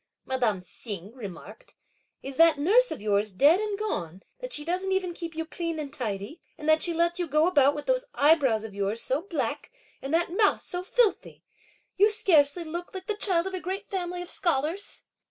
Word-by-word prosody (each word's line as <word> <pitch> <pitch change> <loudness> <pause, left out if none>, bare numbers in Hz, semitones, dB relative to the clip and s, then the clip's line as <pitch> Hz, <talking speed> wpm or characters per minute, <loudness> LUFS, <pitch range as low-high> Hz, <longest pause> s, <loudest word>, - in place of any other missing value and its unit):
madame 240 -7 0
Hsing 200 +1 -4
remarked; 235 - -11 0.5
"is 270 -1 -7
that 330 -1 +6
nurse 440 +12 +4
of - - -5
yours 210 0 +1
dead 290 - +4
and 420 -1 -2
gone 190 - -4 0.2
that - - -7
she 295 -7 +4
doesn't 370 +3 -1
even 375 -2 -1
keep 335 -1 -7
you 325 0 -3
clean 335 0 -4
and 295 -2 -6
tidy, 220 - -5 0.2
and 300 - -7
that 315 0 +5
she 345 - +3
lets 340 +1 +1
you 350 - -1
go 305 +2 +2
about 290 -5 +4
with 295 - -6
those - - 0
eyebrows 280 -7 +3
of 220 -2 -8
yours 200 +3 -2
so 265 +5 0
black 340 -4 -3 0.3
and 270 - -6
that 340 +2 0
mouth 415 0 +3
so 355 - -4
filthy! 440 +3 0 0.5
you 410 +2 +5
scarcely 345 -6 +3
look 345 +3 -7
like 375 0 -6
the 425 - -1
child 375 -4 +2
of 385 - -4
a 370 - -3
great 380 +4 -6
family 355 -2 -3
of 355 - -10
scholars." 335 +4 -2
330 Hz, 200 wpm, -26 LUFS, 265-370 Hz, 0.5 s, that